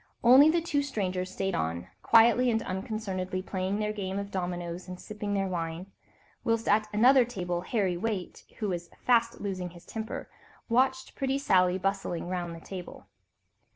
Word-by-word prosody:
Only 260 +6 +8
the 335 +1 +2
two 295 -4 +1
strangers 185 -9 -2
stayed 195 0 -2
on, 85 - -2
quietly 235 +2 +5
and 225 -1 +1
unconcernedly 190 -1 -3
playing 190 +1 -2
their 210 0 -1
game 195 -2 -3
of 200 0 -4
dominoes 175 -1 -4
and 180 0 -7
sipping 210 -1 -4
their 195 -1 +1
wine; 170 +1 -4 0.5
whilst 230 0 0
at 215 +1 +2
another 250 +5 +6
table 180 -7 -3
Harry 185 -2 0
Waite, 200 -2 -4
who 210 -3 -2
was 175 -2 -4 0.2
fast 235 -1 +3
losing 185 -3 -3
his 175 0 -15
temper, 220 +1 -5 0.4
watched 260 +2 +1
pretty 270 0 -1
Sally 185 -9 +3
bustling 195 -3 -2
round 175 -2 -3
the - - -9
table. 185 -3 -8
195 Hz, 160 wpm, -29 LUFS, 180-230 Hz, 0.5 s, Only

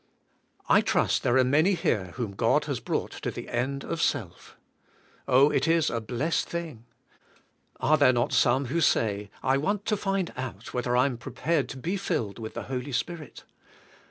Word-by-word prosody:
I - - +5
trust - - +1
there 120 - +2
are 130 - +5
many 155 +9 +3
here 115 - 0
whom 120 -5 -3
God 100 - +2
has - - -2
broug^ht - - -3
to - - -3
the - - -7
end 140 +3 -2
of 165 - -3
self. 105 - -2 0.7
Oh, 135 +3 +5
it - - +1
is 165 -1 +3
a 115 - -2
blessed 130 +9 -1
thing"! 160 -10 -5 0.9
Are 155 - +3
there 140 -3 +6
not 120 -1 0
some 130 +3 +3
who 160 +7 -1
say, 105 -7 +1
I 130 +1 +3
want 200 +8 -1
to 215 - +1
find 195 -3 -2
out 120 -4 -7
whether 125 0 0
I 125 - +5
am 125 -4 -2
prepared 150 +4 -1
to - - -7
be 175 +9 -2
filled 150 - -2
with 110 -1 -7
the - - -4
Holy 130 +1 -4
Spirit? 165 +3 -4
135 Hz, 185 wpm, -27 LUFS, 120-165 Hz, 0.9 s, there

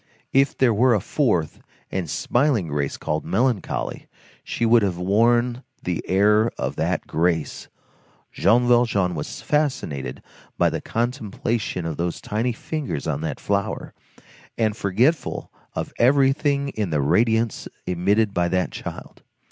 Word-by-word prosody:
If 135 +1 +3
there 125 -3 +4
were 120 +3 +4
a - - +2
fourth, 95 - 0 0.3
and 90 -5 -2
smiling 120 - +1
Grace 70 -1 -2
called 75 +1 -2
Melancholy, 120 -4 -1 0.4
she 115 - -2
would 115 0 +5
have 95 -4 0
worn 120 +7 +2 0.2
the 90 -2 -2
air 105 +3 +4
of - - -2
that - - -1
Grace. 80 -1 -1 0.6
Jean 120 +6 +3
Valjean 115 -7 +3
was 75 -3 -5
fascinated 125 - -1 0.3
by - - +3
the - - -3
contemplation 115 -5 -2
of 80 -2 -3
those 85 0 -2
tiny 110 +4 -1
fingers 135 - -4
on 75 -2 -2
that 80 -1 -3
flower, - - -2 0.6
and 110 -2 +1
forgetful 115 - 0 0.2
of - - -4
everything 140 +2 +3
in 105 -7 -2
the 75 -2 0
radiance 110 - +1 0.2
emitted 100 +4 +1
by 90 -2 +1
that 90 +1 0
child. - - -8
110 Hz, 135 wpm, -23 LUFS, 90-120 Hz, 0.6 s, would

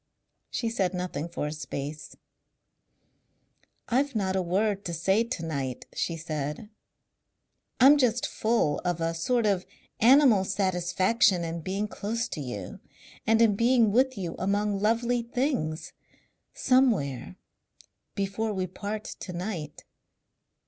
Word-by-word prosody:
She 230 - -2
said 190 -5 -1
nothing 170 -3 -3
for 165 - -3
a 150 - -3
space. 150 0 -6 1.7
"I've 270 +2 +1
not 190 -3 0
a 190 - +2
word 200 +3 0
to 170 - -3
say 190 +7 +2
to 235 -8 -4
night," 135 -6 -4
she 170 - -2
said. 155 +5 -5 1.1
"I'm 280 +4 +7
just 245 -2 +2
full 220 -10 +1
of 175 -2 -1
a 165 0 0
sort 230 +8 0
of 195 -3 +2 0.4
animal 245 -4 +6
satisfaction 185 0 +2
in 165 0 -4
being 195 +5 -2
close 225 +3 -3
to 155 - -5
you.... 105 -9 -6 0.5
And 225 +1 +5
in 215 -3 +4
being 235 -1 +4
with 260 +2 +2
you 175 -4 -4
among 200 +1 0
lovely 230 +3 +1
things.... 235 - -2 0.6
Somewhere 200 - +1 0.8
Before 200 +2 -1
we 185 -2 -1
part 205 +4 -5
to 180 - -8
night 175 -5 -5
195 Hz, 130 wpm, -27 LUFS, 165-230 Hz, 1.7 s, I'm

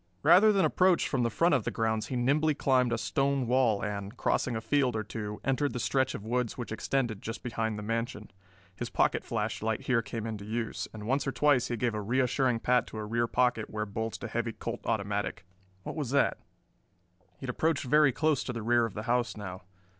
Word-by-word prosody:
Rather 215 +4 +7
than 195 -2 +3
approach 185 -1 +3
from 135 - 0
the 120 - +2
front 165 +9 +2
of 130 -6 +2
the - - -1
grounds 110 -1 -1
he 130 - -4
nimbly 145 +5 +2
climbed 130 -3 +2
a 120 - +1
stone 135 +2 0
wall 120 -4 +2
and, 100 +2 -5
crossing 120 - 0
a - - -1
field 130 -1 +1
or 110 - -1
two, 105 0 -6
entered 135 +2 0
the 125 - -3
stretch 130 +1 +1
of 105 - -7
woods 125 0 -1
which 120 -3 -5
extended 115 -1 -1
just 115 +1 -6
behind 110 -2 -2
the 105 - -5
mansion. 115 0 -3 0.4
His - - -5
pocket - - +1
flashlight 110 +2 -2
here 125 -3 +1
came 115 0 -5
into 110 -3 -5
use, 110 +2 -3
and 105 -1 -8
once 135 +4 0
or - - +1
twice 145 -3 +3
he 120 - -2
gave 120 0 0
a 105 - -2
reassuring 125 +1 +1
pat 125 0 +2
to - - -8
a 110 - -4
rear 115 +2 0
pocket 125 -3 +1
where 105 0 -3
bulged 110 +2 -4
a - - -2
heavy 115 0 -2
Colt - - -5
automatic. 105 -3 -2 0.4
What - - -6
was 145 -6 -3
that? 140 +2 +2 1.0
He - - -34
had 125 - -1
approached 155 +3 0
very 150 +2 +4
close 155 +1 +1
to 125 - -3
the 115 -2 -5
rear 120 0 +3
of 110 - -12
the 110 - -4
house 120 -1 0
now. 95 -3 -7
120 Hz, 220 wpm, -29 LUFS, 110-130 Hz, 1.0 s, Rather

